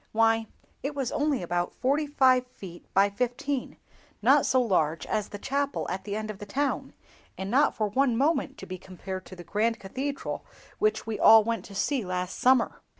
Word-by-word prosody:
Why, 225 0 +3 0.3
it 280 +2 -4
was 270 -4 -2
only 290 -7 0
about 175 0 -2
forty 290 +4 +1
five 260 -3 +3
feet 185 -8 -12
by 200 +1 +4
fifteen—not 250 +5 -1
so 260 - +3
large 170 -9 +1
as 215 -1 -2
the 205 - -7
chapel 280 +6 -2
at 190 - -4
the 205 -1 -3
end 215 0 -3
of 195 - -11
the 205 - -8
town, 280 +7 -2 0.4
and 190 +1 -4
not 275 +4 +3
for 215 - 0
one 245 +2 +1
moment 280 0 +1
to - - -8
be 185 -1 -7
compared 190 0 -7
to 185 - -10
the 175 - -10
grand 220 +5 0
cathedral 270 +8 -4 0.4
which 430 0 +1
we 225 -1 -4
all 220 -1 +8
went 230 -3 -2
to 200 - -11
see 260 +4 0
last 180 0 -3
summer." 255 -1 +3
225 Hz, 190 wpm, -27 LUFS, 195-270 Hz, 0.4 s, all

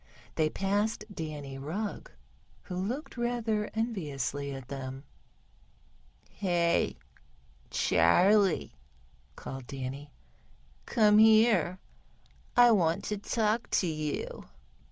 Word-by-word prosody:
They 155 -1 +1
passed 205 +4 -1
Danny 150 -5 -6
Rugg, 185 +10 -4 0.5
who 180 - -7
looked 235 - -4
rather 235 -3 -1
enviously 145 - -2
at 135 -2 -8
them. 135 0 -6 1.3
"Hey, 175 -3 +1 0.7
Charley," 185 - +3 0.6
called 135 -2 -8
Danny, 135 +1 -6 0.8
"come 210 -3 +5
here, 215 -6 +5 0.8
I 245 -1 +8
want 170 -6 +2
to 210 -1 -3
speak 225 0 0
to - - +2
you." 155 -3 -4
180 Hz, 90 wpm, -30 LUFS, 145-215 Hz, 1.3 s, I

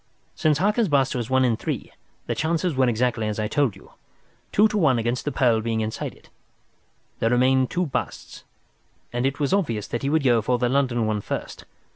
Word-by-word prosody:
Since 155 -2 +1
Harker's 210 - +2
bust 135 -4 +2
was 120 -1 -3
one 130 0 +3
in 120 -2 +2
three, 115 - -4 0.3
the - - -1
chances 165 +2 0
were 130 -2 +2
exactly 115 -1 0
as 105 - -3
I 110 -1 -1
told 135 -4 +1
you—two 205 - -3
to 215 - -4
one 155 -11 +3
against 120 +2 -1
the 145 - -1
pearl 120 -6 +2
being 110 0 -1
inside 110 0 -4
it. - - -22 0.9
There 115 - +2
remained 130 +1 +3
two 180 +1 0
busts, 145 - -5 0.7
and 120 +2 +1
it 135 +2 -3
was 145 +2 0
obvious 120 - 0
that 120 - -3
he 140 - -1
would 155 0 +2
go 120 -4 +4
for 125 +3 +1
the 120 0 0
London 125 -4 +1
one 105 -1 -1
first. - - -6
125 Hz, 200 wpm, -24 LUFS, 115-145 Hz, 0.9 s, go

